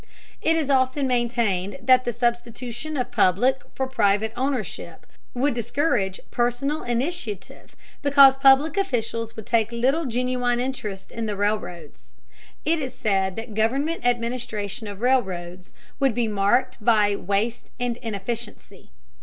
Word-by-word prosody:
It 325 - +2
is 305 -4 0
often 260 +1 +2
maintained 235 -5 0
that 255 -1 +5
the 240 - 0
substitution 240 +4 -3
of 250 -1 -2
public 245 +10 +3
for 265 - -1
private 220 -3 +1
ownership 260 -4 -3 0.3
would 270 +3 +1
discourage 235 - 0
personal 250 +5 0
initiative 240 - -4 0.3
because 280 -2 +7
public 270 +5 +5
officials 230 - -1
would 220 - -8
take 230 -1 +1
little 265 +7 +1
genuine 245 0 0
interest 220 -7 -4
in 230 -1 -4
the 210 - -2
railroads. 175 - -3 0.5
It 325 +2 +2
is 255 -2 -5
said 195 -4 0
that 225 0 -6
government 270 +10 0
administration 235 -3 -2
of 205 0 -8
railroads 185 -8 -1 0.3
would 270 -5 +2
be 240 -2 +1
marked 210 +3 +1
by 210 -3 +4
waste 205 +5 -2
and 245 -1 -1
inefficiency. 225 0 -6
240 Hz, 130 wpm, -24 LUFS, 210-260 Hz, 0.5 s, because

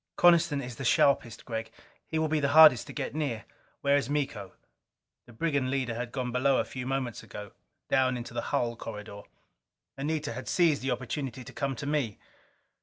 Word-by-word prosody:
"Coniston 170 -5 +4
is 125 -2 -7
the - - -5
sharpest, 120 -3 +2
Gregg. 110 -2 -4 0.4
He 160 - -2
will 160 0 +1
be 155 0 +1
the 140 - +1
hardest 150 -7 +8
to - - -7
get 140 - -4
near." 140 -8 -2 0.4
"Where 140 0 +3
is 140 -3 -2
Miko?" 135 -10 -2 0.7
The - - -13
brigand 140 0 0
leader 130 -3 -1
had 120 +1 -4
gone 125 -2 -3
below 130 +2 +3
a - - +1
few 125 -1 -6
moments 130 -4 -2
ago, 105 -1 -9 0.4
down 130 -1 +2
into 120 0 -7
the 120 - -2
hull 120 -1 0
corridor. 105 -2 -8 0.7
Anita 150 -1 -2
had 125 +3 -7
seized 165 -5 +3
the 135 - -2
opportunity 125 0 -3
to - - -11
come 135 -1 -2
to 135 - -6
me. 140 -8 -1
130 Hz, 185 wpm, -29 LUFS, 120-145 Hz, 0.7 s, hardest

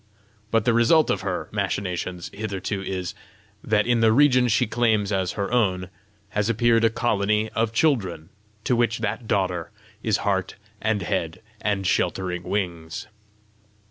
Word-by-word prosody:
But 115 -1 +1
the 120 - +3
result 120 +8 +4
of - - -1
her - - -3
machinations 90 -2 -3
hitherto 100 -1 -3
is, 90 -2 -4 0.5
that 105 -1 +2
in 120 -1 +2
the 110 -1 +5
region 125 0 +5
she 115 +2 +3
claims 110 -3 +1
as 95 -2 0
her 100 0 -3
own, 95 -6 +1 0.4
has 105 +1 0
appeared 115 0 +3
a 115 - +5
colony 105 -1 0
of 115 -1 0
children, 100 - 0 0.3
to 125 - +2
which 115 -1 +1
that 110 +1 -3
daughter 90 -5 0 0.3
is 110 -3 +1
heart 95 -2 0 0.3
and 110 -3 0
head 85 +2 -2 0.2
and 100 -2 -1
sheltering 90 0 0
wings. 85 -5 -3
105 Hz, 145 wpm, -24 LUFS, 95-115 Hz, 0.5 s, the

